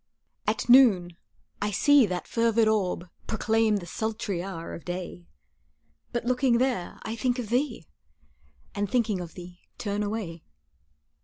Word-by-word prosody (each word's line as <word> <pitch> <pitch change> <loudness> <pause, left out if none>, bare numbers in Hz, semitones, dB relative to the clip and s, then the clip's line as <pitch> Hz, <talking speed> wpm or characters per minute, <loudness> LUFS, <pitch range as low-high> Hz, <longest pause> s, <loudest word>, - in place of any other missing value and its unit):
At - - 0
noon 210 -9 +6 0.5
I 205 - 0
see 280 +4 +5
that 180 -1 -4
fervid 230 -1 +2
orb 190 -5 0 0.2
Proclaim 220 -1 +2
the 195 -4 -3
sultry 215 -1 -3
hour 175 -3 -6
of 170 - -8
day, 175 -1 -6 0.8
But 240 -1 -2
looking 250 -1 +3
there, 245 -7 -1
I 220 - -4
think 245 +1 0
of 235 -4 -4
thee, 245 - -1 0.9
And 200 -1 -2
thinking 225 -6 +1
of 170 -2 -9
thee, 180 0 -11 0.2
turn 205 -1 -2
away. 205 -6 -4
215 Hz, 140 wpm, -27 LUFS, 180-235 Hz, 0.9 s, noon